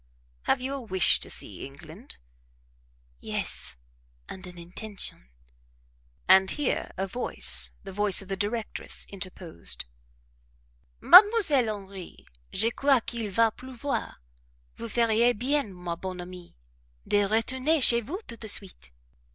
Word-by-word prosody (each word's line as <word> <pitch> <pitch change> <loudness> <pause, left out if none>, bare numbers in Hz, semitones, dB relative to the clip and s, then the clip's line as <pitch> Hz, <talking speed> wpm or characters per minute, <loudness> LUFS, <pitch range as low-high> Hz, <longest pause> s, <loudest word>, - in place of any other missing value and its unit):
"Have - - +2
you 265 +2 -3
a 275 - -5
wish 190 -6 +2
to - - -4
see - - -3
England?" - - -12 1.0
"Yes, - - -4 0.5
and 185 -1 -9
an 180 -1 -12
intention." 180 - -5 1.0
And 190 0 +6
here 295 -3 -2
a 190 - -1
voice, 240 +6 +4
the 195 - -9
voice 205 0 +4
of 195 - -4
the 195 - -3
directress, 210 +3 -2
interposed: 185 - -3 1.2
"Mademoiselle 365 - +6
Henri, 195 -3 -9 0.3
je 225 +4 +2
crois 275 0 +2
qu'il 230 -2 -5
va 225 +3 +2
pleuvoir; 260 +3 -5 0.6
vous 230 - -7
feriez 230 +1 +2
bien, 270 -1 -1
ma 180 -2 -6
bonne 185 +1 -7
amie, 180 0 -11 0.5
de 205 - +2
retourner 260 +8 +1
chez 235 -3 +6
vous 335 - -7
tout 230 - -10
de 220 - -7
suite." 195 - -5
215 Hz, 125 wpm, -26 LUFS, 190-250 Hz, 1.2 s, And